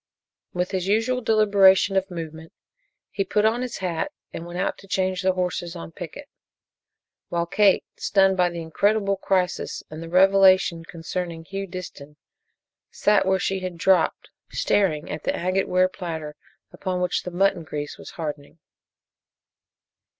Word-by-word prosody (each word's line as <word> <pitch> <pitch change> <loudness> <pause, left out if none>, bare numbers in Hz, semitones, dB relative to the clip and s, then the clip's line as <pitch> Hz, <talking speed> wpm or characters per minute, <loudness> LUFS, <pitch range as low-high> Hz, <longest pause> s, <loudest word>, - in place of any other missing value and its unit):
With 180 +1 -2
his 190 -1 -2
usual 225 +5 +1
deliberation 200 -4 +4
of 190 0 +1
movement 160 -2 -8 0.6
he 200 - -1
put 210 +2 +1
on 230 +3 +2
his 250 -2 -4
hat 175 -4 -2 0.2
and 165 - -6
went 175 +1 -7
out 190 - -1
to 195 - -15
change 185 -1 0
the 185 -1 +2
horses 180 -1 -2
on 85 0 -8
picket, - - -9 1.0
while 170 0 0
Kate, 200 +3 +3
stunned 195 -1 +3
by 180 -1 +3
the 170 -1 -6
incredible 200 +4 +1
crisis 185 -1 -1
and 155 +1 -7
the 165 - -7
revelation 185 -2 +5
concerning 165 0 -5
Hugh 195 +2 -5
Disston, 170 -5 -9 0.7
sat 210 -2 +2
where 190 0 +3
she 190 +1 -1
had 185 -2 -5
dropped, 175 -1 +2 0.2
staring 155 -9 0
at 150 0 -5
the - - 0
agate 185 +2 0
ware 185 0 +3
platter 160 -5 -6 0.4
upon 185 -2 -3
which 180 0 0
the - - -6
mutton 180 -1 +1
grease 150 -2 -6
was - - -10
hardening. 150 -1 -6
185 Hz, 150 wpm, -24 LUFS, 170-195 Hz, 1.0 s, revelation